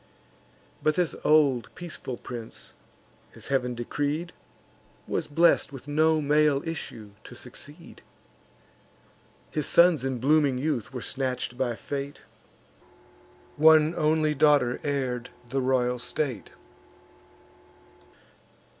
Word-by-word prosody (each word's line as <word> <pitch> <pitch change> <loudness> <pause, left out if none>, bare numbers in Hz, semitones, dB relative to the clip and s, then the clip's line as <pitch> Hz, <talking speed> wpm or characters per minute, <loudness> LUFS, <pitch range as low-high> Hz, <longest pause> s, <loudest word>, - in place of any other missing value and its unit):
But 155 - +2
this 180 -3 0
old 145 -5 +3
peaceful 160 -7 -6
prince, 120 -2 -8 0.6
as - - -10
Heav'n 125 -3 -1
decreed, 145 +8 -3 0.7
Was - - -2
blest 165 0 +3
with 135 0 -10
no 155 +2 +3
male 150 0 +2
issue 115 -10 -6
to 120 - -11
succeed: 145 +7 -11 1.5
His 150 -2 -2
sons 170 -6 +5
in 135 -1 -1
blooming 140 +1 +3
youth 130 -5 -2
were 125 -2 -6
snatch'd 130 -2 -3
by 120 -2 -1
fate; 140 +3 -6 1.4
One 155 +1 +6
only 155 -1 +2
daughter 145 -4 +3
heir'd 130 -4 -2 0.2
the 135 0 0
royal 125 -1 +1
state. 125 -3 -3
140 Hz, 100 wpm, -27 LUFS, 125-155 Hz, 1.5 s, One